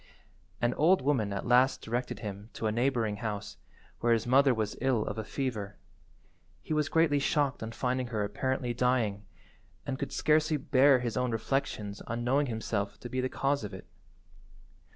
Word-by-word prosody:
An 120 +1 +1
old 165 +2 +3
woman 125 -8 +1
at 100 - -3
last 125 +2 +3
directed 120 +3 -3
him 100 0 -6
to - - -5
a 110 - +2
neighbouring 115 -3 0
house, 105 -2 -5 0.4
where 120 0 +3
his 115 -1 0
mother 135 +2 +5
was 110 -3 -1
ill 130 -5 +1
of 105 - -4
a - - -2
fever. 110 -4 -4 0.9
He - - -3
was 150 -1 +1
greatly 160 -3 +3
shocked 140 -1 +1
on 110 0 -4
finding 125 +1 -1
her 110 -3 -2
apparently 130 +3 -1
dying, 115 -5 0 0.6
and 130 -1 -3
could - - -3
scarcely 155 +1 +2
bear 135 -1 +4
his 120 -1 -2
own 125 0 +1
reflections 115 -3 -2
on 120 +1 -3
knowing 140 +4 +2
himself 110 -3 -3
to 120 - -7
be 130 +1 -1
the 130 - -1
cause 140 -1 0
of 100 -2 -6
it. - - -10
125 Hz, 175 wpm, -30 LUFS, 110-135 Hz, 0.9 s, mother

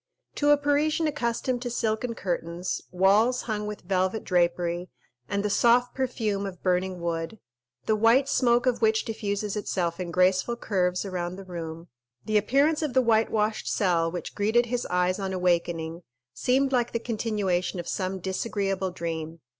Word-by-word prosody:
To 290 - +1
a 290 - +7
Parisian 290 +3 +1
accustomed 250 -3 -1
to 245 - -3
silken 230 0 -1
curtains, 175 -1 -3
walls 205 +7 +3
hung 210 -2 -3
with 210 0 -6
velvet 190 +3 0
drapery, 175 0 0 0.4
and 200 +1 -1
the - - +1
soft 240 +4 +4
perfume 220 -6 -1
of 180 -3 -9
burning 185 0 0
wood, 165 +3 -3 0.5
the 220 - +2
white 230 +5 +4
smoke 245 -3 +3
of 250 -2 +1
which 220 0 +2
diffuses 205 -2 -3
itself 180 -4 -2
in 180 -1 -3
graceful 185 +6 +2
curves 180 -5 0
around 180 -2 -3
the 195 0 -10
room, 165 -2 -7 0.4
the 215 0 +2
appearance 280 +9 +2
of 295 -5 -2
the 260 - +6
whitewashed 220 -1 +1
cell 170 -4 +1
which 175 - -6
greeted 220 +4 +2
his 245 +1 -2
eyes 180 +1 +1
on 190 -1 -3
awakening 170 -2 0 0.3
seemed 265 - +1
like 245 -2 +1
the 230 - 0
continuation 210 -6 -1
of 175 - -6
some 190 0 -2
disagreeable 195 0 -2
dream. 165 -2 -5
200 Hz, 160 wpm, -26 LUFS, 180-235 Hz, 0.5 s, a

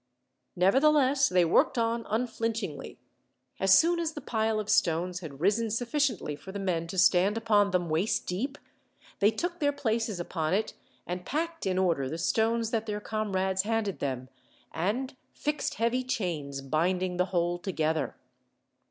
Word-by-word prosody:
Nevertheless, 270 +8 +4
they 180 -1 +4
worked 165 - +3
on 230 0 0
unflinchingly. 225 - -3 0.6
As 190 0 +6
soon 340 +1 +3
as 325 -1 -1
the 295 - -6
pile 220 -3 0
of 210 - -4
stones 180 -4 +1
had 150 -6 -9
risen 210 +6 +2
sufficiently 245 - -1
for 190 - -10
the 200 - -5
men 175 -4 -1
to 190 - -6
stand 185 +3 +4
upon 210 -3 +3
them, 180 -2 0
waist 165 +7 0
deep, 260 +11 -3 0.6
they 205 - +5
took 345 +9 -3
their 290 -2 +2
places 225 -7 -1
upon 165 -1 -1
it, 215 - -1 0.3
and 180 0 -4
packed 330 - -3
in 185 -1 0
order 165 -8 +1
the 160 - -4
stones 225 +5 +1
that 225 -1 -1
their 210 -1 -2
comrades 190 -3 -1
handed 215 -2 -1
them, 130 -2 -3 0.4
and 250 - -2 0.2
fixed 300 0 -2
heavy 235 +3 0
chains 160 - -3
binding 180 +6 0
the 180 - +2
whole 175 -1 0
together. 160 -6 -1
200 Hz, 155 wpm, -29 LUFS, 175-230 Hz, 0.6 s, As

